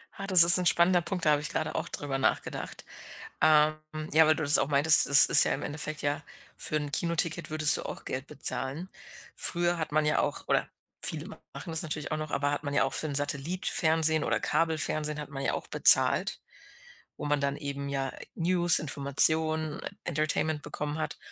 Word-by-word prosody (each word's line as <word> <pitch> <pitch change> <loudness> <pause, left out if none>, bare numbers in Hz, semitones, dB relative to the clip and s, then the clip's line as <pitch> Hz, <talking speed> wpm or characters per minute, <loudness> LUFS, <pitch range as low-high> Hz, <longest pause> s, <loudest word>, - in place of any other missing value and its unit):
Ah, 195 - -9
das 185 -4 +9
ist 175 +2 +11
'n 180 - -2
spannender 175 +1 +2
Punkt, 180 0 -5
da 150 - +2
habe 145 - -1
ich 150 - -4
grade 155 - -5
auch 160 - -6
drüber 135 -2 -5
nachgedacht. - - -5 0.6
Ähm, 155 0 +2 0.4
ja, 160 +1 +4
weil 155 - +2
du 160 - -6
das 145 +1 +6
auch 140 - -2
meintest, 150 +2 +3
das 140 0 +8
ist - - +7
ja - - -2
im - - -6
Endeffekt, 155 +1 -5
ja 145 +1 -4 0.3
für 155 - -4
'n 150 -1 -5
Kinoticket 170 +1 -2
würdest 155 -1 +3
du - - -8
auch - - -10
Geld 130 +1 -6
bezahlen. 145 +3 -4 0.5
Früher 175 0 0
hat 160 -3 -7
man 155 0 -1
ja 150 - 0
auch, - - -5
oder - - -1 0.4
viele - - -1
machen - - -13
das 160 -1 -1
natürlich 155 -2 -6
auch 155 - -3
noch, 155 -1 -8
aber 145 +1 -3
hat 145 - -6
man 145 - -6
ja 145 - 0
auch - - -4
für 155 - 0
'n 145 - -7
Satellit-Fernsehen 160 +2 0
oder - - -3
Kabelfernsehen 155 -2 -2
hat 150 - -10
man 135 -1 -9
ja - - -2
auch - - -7
bezahlt, - - +3 0.8
wo - - -9
man 145 -1 -2
dann 140 0 -3
eben, 140 -1 -7
ja, 135 -1 -5 0.2
News, 175 0 +2
Informationen, 155 +2 +1 0.2
Entertainment 155 -1 -4
bekommen 150 +1 -7
hat. 155 - -6
155 Hz, 200 wpm, -26 LUFS, 145-160 Hz, 0.8 s, ist